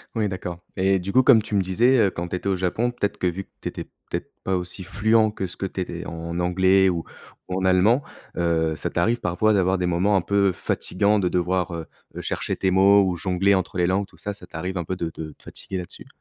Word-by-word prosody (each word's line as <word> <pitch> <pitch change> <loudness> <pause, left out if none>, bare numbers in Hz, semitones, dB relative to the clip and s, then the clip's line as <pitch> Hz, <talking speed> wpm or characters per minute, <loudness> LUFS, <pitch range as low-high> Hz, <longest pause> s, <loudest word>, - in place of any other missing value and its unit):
Oui, 110 -2 +1
d'accord 90 -2 -5 0.2
et 95 0 +3
du 95 +2 -4
coup 130 - +6
comme 120 -4 +6
tu 105 - -8
me 100 - +3
disais, 115 +8 +3
heu, - - -2
quand 85 0 -4
tu - - -2
étais 95 - -6
au 95 - +2
Japon, 95 +7 0
peut-être 105 -4 -2
que 90 - 0
vu 90 +2 -3
que - - -34
tu - - -3
étais - - -6 0.3
peut-être - - -4
pas 95 - 0
aussi 90 +1 -4
fluent 110 +3 +2
que 95 - -3
ce 85 - -12
que - - -3
tu 95 0 -4
étais 85 -1 -5
en 85 +1 -5
anglais 95 +2 +4
ou 85 -2 -2 0.5
ou 90 +1 -1
en 95 - -1
allemand, 95 +8 +4 0.4
heu, 80 -2 +1
ça - - -2
t'arrive 120 +1 +1
parfois 100 +5 +1
d'avoir 95 -1 +2
des 90 - -1
moments 90 +4 +2
un 95 - +3
peu 100 +2 +2
fatigants 100 +4 0
de 90 -2 +1
devoir, 90 0 0
heu 85 -1 -5 0.3
heu, - - -5
chercher - - -2
tes 95 - 0
mots 100 +2 +6
ou 90 -1 0
jongler 95 +3 +1
entre 95 -1 -1
les 90 - +3
langues, 95 +2 0
tout - - -21
ça, 105 - -4
ça 95 -3 -11
t'arrive 90 +3 -5
un 85 - -2
peu 95 - -3
de 85 -2 -3
de 75 -1 -7
te - - -24
fatiguer 95 - -7
là-dessus? 90 -1 -8
95 Hz, 255 wpm, -24 LUFS, 90-100 Hz, 0.5 s, coup